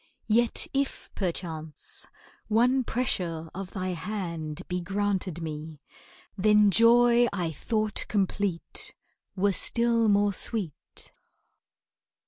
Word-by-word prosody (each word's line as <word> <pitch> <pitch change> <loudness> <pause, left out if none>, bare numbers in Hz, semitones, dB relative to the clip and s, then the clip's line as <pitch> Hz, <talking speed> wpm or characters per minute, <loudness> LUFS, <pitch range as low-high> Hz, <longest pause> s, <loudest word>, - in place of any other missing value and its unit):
Yet, 230 +2 +3
if 275 0 -2
perchance 165 -5 -4 0.4
one 245 +4 +3
pressure 170 -10 -2
of 190 0 -6
thy 185 -1 -3
hand 170 -4 -4
Be 180 0 -2
granted 190 -2 -2
me, 155 -1 -6 0.6
then 210 0 +5
joy 240 +2 +6
I 175 -5 -2
thought 215 - 0
complete 195 -3 -1 0.4
Were 200 +1 +2
still 230 +1 +3
more 205 0 +3
sweet. 190 -6 -3
200 Hz, 100 wpm, -27 LUFS, 170-225 Hz, 0.6 s, joy